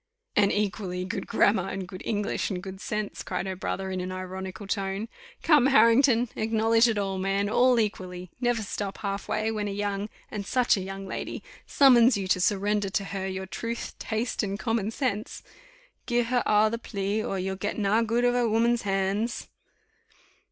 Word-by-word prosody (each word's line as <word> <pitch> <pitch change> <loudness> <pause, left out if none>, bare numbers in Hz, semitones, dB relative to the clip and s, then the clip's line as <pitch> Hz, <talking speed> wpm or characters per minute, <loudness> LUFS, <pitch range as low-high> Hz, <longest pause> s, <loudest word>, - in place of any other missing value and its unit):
"And 200 -1 +4
equally 190 -3 -2
good 195 +5 -4
grammar, 200 -4 +2
and 190 -1 -4
good 185 0 -9
English, 205 -2 -1
and 190 -3 -3
good 190 0 -8
sense," 210 -1 -3
cried - - -3
her 190 -1 -3
brother, 190 +1 -3
in 185 -1 -2
an 185 +1 -4
ironical 185 +1 -6
tone. 195 +1 -2 0.4
"Come, 295 -5 +5
Harrington, 250 -1 +5
acknowledge 225 +1 +3
it 225 -2 0
all, 195 -2 -1
man 195 +1 0
all 245 +3 +4
equally. 185 -4 -3
Never 240 -2 +1
stop 200 0 -4
half 200 -2 -4
way, 215 +1 0
when 210 -2 -2
a - - -3
young 205 0 -2 0.2
and 210 -2 -4
such 245 +3 +2
a 195 - -3
young 195 +1 -6
lady, - - -5 0.2
summons 250 -4 +6
you 195 -2 -3
to 185 - +2
surrender 205 +1 +1
to 200 +1 -1
her 195 -1 -4
your 190 0 -4
truth, 230 +6 -5
taste, 225 +2 -2
and 200 -1 -2
common 225 -2 -1
sense. 225 -3 -3 0.6
Gi' 240 -1 +2
her 245 +1 +1
a' 210 +1 +5
the 230 - -3
plea, 205 -1 -2
or 195 - -2
you'll 190 +1 -2
get 205 +2 -3
na 210 +1 +2
good 230 +2 +1
of 245 - +3
a 245 -2 +2
woman's 235 +2 +2
hands." 200 +3 -1
205 Hz, 185 wpm, -27 LUFS, 195-230 Hz, 0.6 s, summons